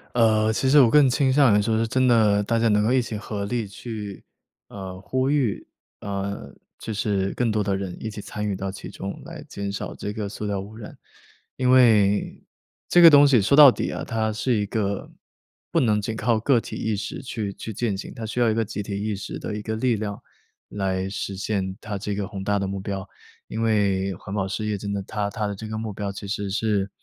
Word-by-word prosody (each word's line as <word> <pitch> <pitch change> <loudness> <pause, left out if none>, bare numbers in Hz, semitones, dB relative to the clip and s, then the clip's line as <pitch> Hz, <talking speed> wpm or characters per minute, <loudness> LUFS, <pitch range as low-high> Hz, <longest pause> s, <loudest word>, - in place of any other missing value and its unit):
呃， 110 -2 +4
其 120 +4 0
实 145 +2 +7
我 120 - +6
更 145 0 +6
倾 135 +1 +2
向 130 -6 +5
于 105 - +3
说 110 +1 +1
是 115 0 +1
真 130 +2 +2
的， 105 -4 +4
大 115 +2 0
家 115 - +3
能 105 -1 +3
够 110 - +2
一 130 0 +4
起 115 -2 -5
合 105 -1 -4
力 115 +2 -2
去 105 -1 -7 0.4
呃， 95 -2 -8
呼 130 +6 -1
吁， 140 -8 0 0.3
啊， 100 -1 -3 0.5
就 110 - -6
是 100 -2 0
更 120 -2 0
多 105 -1 +1
的 100 -1 0
人 95 -2 -5
一 110 - -2
起 105 - -8
参 105 +1 -5
与 100 - -1
到 95 0 -3
其 95 +1 -8
中， 100 +1 -7
来 - - -9
减 100 0 -4
少 100 - -5
这 105 - -5
个 105 -1 -4
塑 105 +1 -6
料 100 -1 -1
污 100 +3 -9
染。 110 -1 -10 0.6
因 125 -1 0
为 110 -6 +4 0.5
这 175 - +6
个 170 - +11
东 145 -1 +8
西 130 -6 +5
说 110 +8 +3
到 145 -2 +10
底 - - -3
啊， - - -4
它 110 -2 -1
是 125 +4 0
一 105 -1 0
个 100 -1 -2 0.6
不 - - +3
能 105 -4 +2
仅 110 +2 -3
靠 115 +1 +2
个 120 +2 +3
体 - - -8
意 110 - -1
识 105 +7 -5
去 110 -6 -4
去 110 - -7
践 110 -1 -1
行， - - -7
它 115 - -6
需 120 +3 -2
要 115 - +4
一 - - +2
个 115 0 0
集 105 0 -5
体 100 0 -4
意 105 0 -1
识 100 - -6
的 105 - -5
一 105 - -4
个 110 +1 -3
力 120 0 +2
量， 105 -1 -4 0.5
来 95 -2 -2
实 95 0 -4
现 95 -2 -2
它 105 -2 -5
这 100 +1 -3
个 100 -1 -3
宏 95 0 -6
大 100 0 +1
的 100 - -2
目 95 0 -4
标， 95 0 -4 0.4
因 110 - -4
为 100 -3 +1
环 95 - -9
保 95 - 0
事 100 +3 -3
业 105 -1 -1
真 100 +1 -5
的 100 -1 -2
它 100 +1 -3
它 105 0 -3
的 100 - -4
这 110 +3 -7
个 110 - -4
目 110 -1 -4
标 100 0 -4
其 100 - -8
实 100 0 -3
是， 100 -1 0
105 Hz, 260 characters per minute, -24 LUFS, 100-115 Hz, 0.6 s, 个